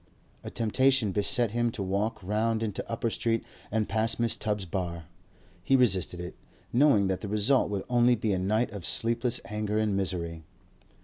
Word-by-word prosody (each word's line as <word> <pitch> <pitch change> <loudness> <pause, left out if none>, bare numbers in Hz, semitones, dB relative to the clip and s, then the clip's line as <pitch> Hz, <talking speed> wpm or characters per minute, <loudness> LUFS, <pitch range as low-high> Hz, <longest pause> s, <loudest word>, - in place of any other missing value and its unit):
A - - -6
temptation 120 0 +2
beset 105 +4 +1
him 120 +1 +1
to 100 - -4
walk 100 +2 -2
round 110 +3 0
into 105 -3 -3
Upper 115 0 -1
Street 115 0 0 0.3
and 110 0 0
pass 110 +2 +1
Mrs. 115 -1 0
Tubbs's 105 -3 -2
bar. 85 -2 -4 0.6
He 135 - +3
resisted 95 -8 +2
it, 90 0 -6 0.4
knowing 125 -6 +4
that 95 -1 -1
the 105 - -5
result 105 +6 +2
would 100 -2 -3
only 120 0 +4
be 105 -2 -1
a 95 - 0
night 110 +6 0
of 100 -4 -7
sleepless 120 +3 +2
anger 105 -1 -2
and 110 -2 +1
misery. 85 -4 -3
105 Hz, 175 wpm, -28 LUFS, 95-115 Hz, 0.6 s, knowing